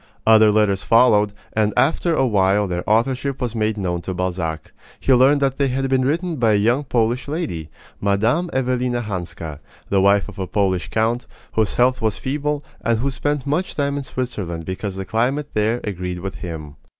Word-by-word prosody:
Other 110 Hz, -1 st, +6 dB
letters 105 Hz, -2 st, +2 dB
followed, 110 Hz, -3 st, +4 dB, 0.2 s
and 105 Hz, -1 st, +1 dB
after 165 Hz, +3 st, +2 dB
a 135 Hz, -, +2 dB
while 100 Hz, -2 st, +2 dB
their 90 Hz, -1 st, -3 dB
authorship 130 Hz, +5 st, +1 dB
was 125 Hz, -3 st, -2 dB
made 110 Hz, -1 st, 0 dB
known 90 Hz, -3 st, -2 dB
to 95 Hz, +1 st, -5 dB
Balzac. 90 Hz, -3 st, -3 dB, 0.3 s
He 135 Hz, -, +3 dB
learned 135 Hz, +3 st, +5 dB
that 135 Hz, 0 st, 0 dB
they 140 Hz, -, +3 dB
had 135 Hz, +1 st, -1 dB
been 130 Hz, -1 st, +3 dB
written 165 Hz, +4 st, -1 dB
by 115 Hz, -3 st, +3 dB
a -, -, +4 dB
young 120 Hz, +8 st, +2 dB
Polish 120 Hz, 0 st, 0 dB
lady, 140 Hz, -, -4 dB, 0.3 s
Mme. 110 Hz, -, +1 dB
Evelina 125 Hz, -1 st, 0 dB
Hanska, 85 Hz, -6 st, -5 dB, 0.3 s
the 100 Hz, -1 st, +3 dB
wife 100 Hz, +1 st, +4 dB
of 105 Hz, -2 st, -10 dB
a 95 Hz, -, -2 dB
Polish 95 Hz, -3 st, 0 dB
count, 115 Hz, +2 st, 0 dB, 0.2 s
whose 110 Hz, -2 st, 0 dB
health 125 Hz, +1 st, +2 dB
was 110 Hz, -2 st, 0 dB
feeble, 145 Hz, +2 st, -2 dB, 0.2 s
and 115 Hz, -1 st, +2 dB
who 135 Hz, +5 st, -1 dB
spent 145 Hz, 0 st, -2 dB
much 155 Hz, +6 st, -1 dB
time 140 Hz, -1 st, 0 dB
in 145 Hz, -, -2 dB
Switzerland 105 Hz, -, -4 dB
because 95 Hz, +2 st, -4 dB
the 95 Hz, 0 st, -5 dB
climate 130 Hz, +8 st, 0 dB
there 110 Hz, +3 st, +1 dB
agreed 90 Hz, -3 st, -4 dB
with 95 Hz, +1 st, -4 dB
him. 75 Hz, -4 st, -7 dB
110 Hz, 185 wpm, -21 LUFS, 95-130 Hz, 0.3 s, Other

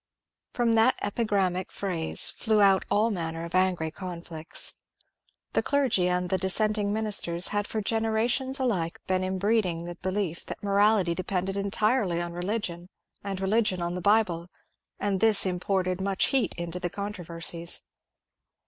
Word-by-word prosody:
From 235 Hz, -2 st, +2 dB
that 225 Hz, +3 st, +5 dB
epigrammatic 200 Hz, -4 st, 0 dB
phrase 175 Hz, -5 st, 0 dB
flew 220 Hz, -2 st, +1 dB
out 195 Hz, -2 st, +5 dB
all 210 Hz, +3 st, +2 dB
manner 165 Hz, -3 st, -3 dB
of 170 Hz, -, -9 dB
angry 180 Hz, -4 st, +1 dB
conflicts. 170 Hz, -3 st, -2 dB, 0.8 s
The -, -, +3 dB
clergy 255 Hz, -, +2 dB
and 180 Hz, 0 st, -1 dB
the 190 Hz, -, +1 dB
dissenting 205 Hz, +2 st, 0 dB
ministers 205 Hz, -5 st, 0 dB
had 205 Hz, 0 st, -1 dB
for 220 Hz, -, -2 dB
generations 225 Hz, +5 st, 0 dB
alike 185 Hz, -11 st, -1 dB
been 185 Hz, 0 st, +1 dB
im 190 Hz, 0 st, -2 dB
breeding 190 Hz, -4 st, +1 dB
the 175 Hz, -, -5 dB
belief 185 Hz, -1 st, -3 dB
that -, -, -7 dB
morality 200 Hz, -2 st, +3 dB
depended 185 Hz, +1 st, -2 dB
entirely 200 Hz, -1 st, +1 dB
on 175 Hz, 0 st, -4 dB
religion 180 Hz, -1 st, -3 dB, 0.3 s
and 195 Hz, -2 st, -4 dB
religion 195 Hz, -1 st, +1 dB
on 170 Hz, 0 st, -2 dB
the 180 Hz, -, -4 dB
Bible, 185 Hz, -4 st, +2 dB, 0.5 s
and 200 Hz, -2 st, 0 dB
this 215 Hz, -1 st, +4 dB
imported 185 Hz, 0 st, -1 dB
much 195 Hz, 0 st, +1 dB
heat 265 Hz, -3 st, +1 dB
into 170 Hz, +1 st, -4 dB
the 175 Hz, -, -2 dB
controversies. 170 Hz, -3 st, -2 dB
190 Hz, 145 wpm, -27 LUFS, 175-215 Hz, 0.8 s, that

